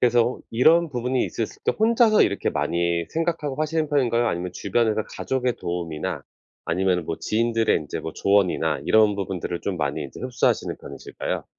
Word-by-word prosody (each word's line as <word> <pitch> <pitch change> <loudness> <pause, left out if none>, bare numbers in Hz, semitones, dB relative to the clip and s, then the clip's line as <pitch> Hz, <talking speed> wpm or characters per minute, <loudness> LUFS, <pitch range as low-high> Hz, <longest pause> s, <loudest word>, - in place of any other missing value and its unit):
그래서 120 0 +3
이런 160 +8 +4
부분이 125 -1 -1
있었을 115 - -5
때 - - +3
혼자서 225 0 +5
이렇게 100 - 0
많이 85 0 0
생각하고 160 -4 -2
하시는 155 0 -1
편인가요? 120 -5 +2
아니면 90 -4 -2
주변에서 110 +3 0
가족의 125 -2 -1
도움이나 85 -3 -3 0.4
아니면은 90 0 0
뭐 80 - -3
지인들의 115 0 +1
인제 75 - -4
뭐 80 - -6
조언이나 100 -2 +1
이런 110 -1 +5
부분들을 95 -3 -4
좀 100 -2 -3
많이 75 -1 -2
이제 70 - -10
흡수하시는 125 -1 0
편이실까요? - - -5
115 Hz, 425 characters per minute, -24 LUFS, 90-130 Hz, 0.4 s, 혼자서